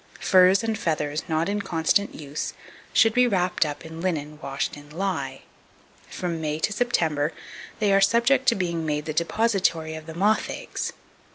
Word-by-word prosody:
Furs 185 +2 +5
and 225 -1 0
feathers 150 -3 -1
not 160 +2 +1
in 205 +1 -1
constant 190 +2 0
use 150 0 -5 0.4
should 225 -1 +4
be 250 +1 +4
wrapped 180 -6 +1
up 145 +2 -6
in 160 0 -8
linen 150 -4 -2
washed 135 0 -3
in 145 0 -13
lye. 155 -5 -3 0.7
From 170 -3 -3
May 150 -1 -1
to 205 +6 -1
September 160 -10 0 0.4
they 210 -3 +2
are 195 - +5
subject 240 +6 +3
to 235 - +5
being 170 -3 -2
made 150 -1 -2
the 155 - -3
depositary 170 -2 +1
of 160 0 -8
the 160 - -8
moth 205 +5 +2
eggs. - - -4
170 Hz, 170 wpm, -25 LUFS, 155-200 Hz, 0.7 s, Furs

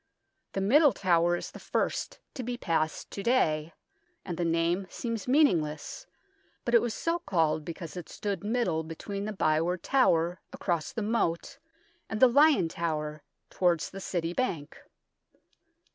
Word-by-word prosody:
The 195 - -1
Middle 280 +8 +5
Tower 175 -2 +2
is - - -6
the - - -10
first - - -2 0.2
to 260 - -5
be 245 0 -4
passed 160 -6 -1
to 200 - -5
day, 165 -10 +2 0.5
and 175 - -4
the 175 - -2
name 170 +3 +1
seems 230 0 -4
meaning 275 - +5
less, 150 - -7 0.6
but 235 - -1
it 235 - +7
was 235 -2 -2
so 335 +1 -1
called 165 - +1
because 170 +1 -7
it 175 -3 -7
stood 200 -1 -4
middle 210 -7 0
between 195 +5 -5
the 215 - -3
Byward 170 -1 +1
Tower 175 -10 +2
across 170 -5 -2
the 225 - -3
moat 220 +3 -1 0.5
and 220 - -3
the 260 - +8
Lion 280 - +5
Tower 155 -2 -3 0.3
towards 175 -3 +1
the 195 - -8
City 170 -2 -2
bank. 175 - -2
180 Hz, 155 wpm, -29 LUFS, 165-235 Hz, 0.6 s, the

